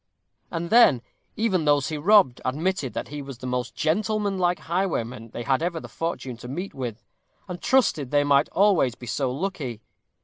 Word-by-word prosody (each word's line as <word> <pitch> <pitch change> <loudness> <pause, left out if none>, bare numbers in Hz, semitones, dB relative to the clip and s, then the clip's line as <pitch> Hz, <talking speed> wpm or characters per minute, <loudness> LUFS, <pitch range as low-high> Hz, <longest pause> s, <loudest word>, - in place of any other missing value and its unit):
And 170 0 -4
then, 220 - +6 0.3
even 200 -7 +1
those 145 -2 +3
he 155 - -3
robbed, 185 - +4
admitted 150 +1 -1
that - - -4
he 145 0 -6
was 135 -3 -8
the 130 - -9
most 125 -1 -3
gentlemanlike 195 0 0
highwayman 130 - -2
they 120 - -6
had 135 +3 +1
ever 170 -1 -1
the - - -9
fortune 150 -7 -4
to 120 - -10
meet 175 +10 -5
with, 120 -4 -6 0.4
and 180 -2 -7
trusted 195 - +2
they 145 +1 +3
might 145 0 +3
always 190 - +3
be 125 - -11
so 125 +3 -1
lucky. 140 - -4
150 Hz, 175 wpm, -25 LUFS, 130-185 Hz, 0.4 s, then